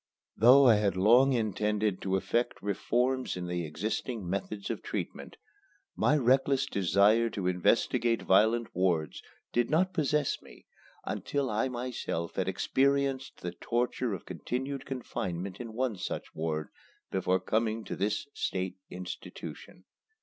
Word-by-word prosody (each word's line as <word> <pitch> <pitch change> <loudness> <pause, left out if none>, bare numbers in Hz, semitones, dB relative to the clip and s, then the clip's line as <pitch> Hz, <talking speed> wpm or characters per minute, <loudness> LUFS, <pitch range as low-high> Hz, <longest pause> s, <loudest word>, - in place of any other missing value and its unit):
Though 130 +5 +7
I 115 -4 +7
had 100 -3 +1
long 120 +8 +6
intended 105 -3 0
to 95 -1 0
effect 120 +5 -1
reforms 125 +5 0
in 90 -1 -4
existing 90 +6 -3
methods 100 +2 -3
of - - -4
treatment, - - -5 0.6
my 150 - +3
reckless 135 +1 +3
desire 100 - +3
to 100 -4 -4
investigate 90 +6 +2
violent 110 +4 +3
wards 85 -4 0 0.3
did 120 0 +2
not 180 +5 +2
possess 150 -3 +1
me - - -16 0.4
until 140 -4 -2
I 110 +5 0
myself 120 -9 -3
had - - 0
experienced 135 0 0
the 90 - -3
torture 120 +2 -1
of - - -10
continued 130 - -4
confinement 95 -8 -4
in 120 -2 -6
one 120 -3 -1
such - - -5
ward 80 -1 -2 0.4
before 95 0 +1
coming 110 +1 0
to - - -5
this 105 +6 -1
state 95 0 -2
institution. 90 0 -8
110 Hz, 130 wpm, -30 LUFS, 95-130 Hz, 0.6 s, Though